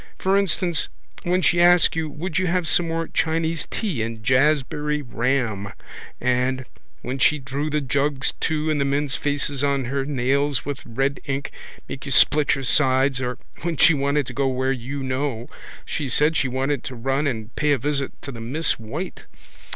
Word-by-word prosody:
For 190 +1 +1
instance 180 -4 +1 0.3
when 180 +1 +1
she 175 +2 +4
asked 175 -2 +6
you 160 -1 -1
would 165 +5 -3
you 185 - 0
have 175 -1 0
some 170 +1 +3
more 165 0 -2
Chinese 160 0 0
tea 185 - -2
and 115 0 -4
jaspberry 150 +3 +2
ram 120 -5 -1 0.5
and 125 +1 0 0.4
when 130 +2 -4
she 150 +4 +4
drew 140 +2 -3
the 150 0 0
jugs 140 +1 0
too 155 0 0
and 150 -2 0
the - - +4
men's 140 0 +1
faces 145 -1 0
on 140 -2 +1
her 135 +2 -1
nails 140 +1 0
with 145 -1 -3
red 135 +4 -1
ink 140 -1 -3 0.4
make 135 +1 -7
you - - -4
split 145 +3 +5
your 135 - -5
sides 130 0 +3
or 125 -1 -2 0.2
when 170 -2 -2
she 165 - +6
wanted 140 0 +1
to - - -7
go 140 -1 +1
where 130 0 0
you 135 +2 -4
know 130 -2 -2 0.4
she 140 -3 -3
said 150 +6 +3
she 140 - +2
wanted 130 +1 -1
to 130 - -5
run 135 +5 0
and 110 -4 -4
pay 150 0 +1
a 145 - +4
visit 140 +1 -1
to 140 - -5
the 115 -3 -8
Miss 140 +6 -1
White. 140 +12 -6
140 Hz, 185 wpm, -23 LUFS, 130-150 Hz, 0.5 s, asked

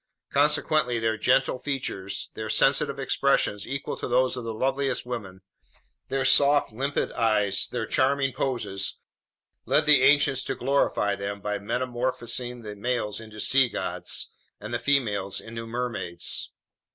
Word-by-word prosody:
Consequently, 145 -3 +2
their 115 -1 0
gentle 130 +2 +2
features, 125 -9 -3
their 110 0 -6
sensitive - - +2
expressions 105 -1 +1
equal 140 +1 -4
to - - -5
those 130 +1 +2
of 125 - -6
the 115 - -4
loveliest 135 +3 -1
women, 100 -7 -6 0.7
their 135 0 -1
soft, 145 0 +4
limpid 135 +6 -2
eyes, 105 -4 +2
their 120 -2 -2
charming 135 0 +1
poses, 115 -7 -2 0.7
led - - +3
the 150 -3 +7
ancients 140 -1 +4
to - - -2
glorify 120 -7 +1
them 100 0 -5
by 105 0 -3
metamorphosing 120 +1 -3
the 105 -1 -7
males 110 -1 -2
into 110 -1 -11
sea 135 +2 +4
gods - - -1 0.3
and 105 +3 -7
the 120 - 0
females 105 -9 0
into 115 0 -8
mermaids. 115 -7 -3
120 Hz, 140 wpm, -26 LUFS, 105-135 Hz, 0.7 s, the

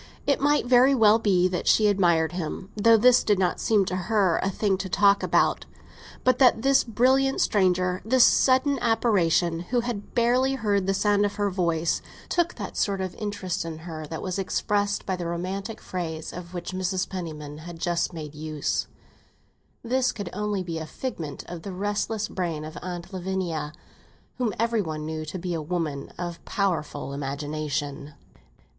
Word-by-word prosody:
It 280 - +1
might 290 -1 +3
very 255 +2 +5
well 220 -2 +5
be 185 -5 +3
that 180 - -3
she 215 - +5
admired 170 -6 +3
him—though 195 +6 +1
this 250 +3 +5
did 205 -2 +2
not 180 -2 0
seem 210 -3 +2
to 185 - -2
her 185 -1 +1
a 195 - 0
thing 195 0 0
to 190 - -4
talk 200 +2 +4
about. - - +1 0.6
But 255 -1 +3
that 245 -4 +5
this 275 0 +4
brilliant 260 +4 +2
stranger—this 185 +5 +2
sudden 270 +2 +4
apparition, 180 -8 +2
who 240 +8 -1
had 235 -4 -5
barely 250 +3 +3
heard 200 -6 0
the 195 - +2
sound 205 +1 +2
of 205 0 -1
her 205 -1 0
voice—took 175 - -1
that - - -6
sort 200 -2 0
of 185 -1 -3
interest 200 -3 -3
in 165 -1 -6
her 155 -3 -6
that 160 +1 -6
was 185 0 -3
expressed 205 +1 0
by 190 - -1
the 175 -2 -4
romantic 190 +5 -4
phrase 160 -3 -5
of 180 0 -8
which 175 +1 -5
Mrs. 185 0 -1
Penniman 155 -5 -6
had 170 +1 -9
just 175 0 -1
made 155 -4 -7
use: 155 -1 -2 1.0
this 250 +1 +1
could 205 -4 -6
only 210 -2 -2
be 165 -2 -4
a 160 - -6
figment 165 - -5
of 175 -2 -7
the 195 +2 -7
restless 205 +3 -2
brain 165 -5 -3
of 155 - -9
Aunt 175 0 -6
Lavinia, 180 -5 -3 0.7
whom 240 -4 +1
every 230 0 +1
one 155 -4 -4
knew 155 0 -4
to 155 +5 -5
be 180 0 -3
a 165 - -2
woman 155 -3 -3
of 175 -1 -5
powerful 155 -8 -2
imagination. 145 +1 -4
185 Hz, 170 wpm, -25 LUFS, 165-215 Hz, 1.0 s, very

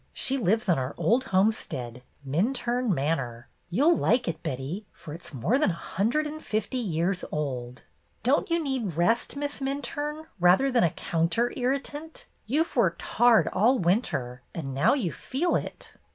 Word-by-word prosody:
She 265 - 0
lives 220 -2 +1
on 175 -6 +3
our 130 +1 -3
old 250 +4 +2
homestead, 160 - 0 0.3
Minturne 240 - 0
Manor. 135 -6 -1 0.2
You 225 - +1
'll 340 +1 +6
like 245 -4 +2
it, 160 -1 -3
Betty, 140 +11 -4
for 150 - -10
it 170 - -9
's - - -5
more 155 - +1
than 300 - +3
a - - 0
hundred 225 - -1
and 310 +1 -6
fifty 220 +4 -2
years 180 -3 -1
old." 130 -4 -4 0.4
"Don't 265 +5 +2
you 335 - +2
need 255 - -2
rest. 225 +11 +1
Miss 285 0 -4
Minturne, 290 +3 -3
rather 185 +10 +5
than 245 -2 +3
a 170 - +4
counter 170 +11 0
irritant? 280 +5 -3 0.2
You've 305 +8 0
worked 195 -9 +2
hard 230 -6 +4
all 235 +8 +3
winter, 165 - 0
and 135 -5 -4
now 170 - +3
you 205 - -1
feel 320 - -1
it." - - -5
215 Hz, 165 wpm, -27 LUFS, 160-265 Hz, 0.4 s, ll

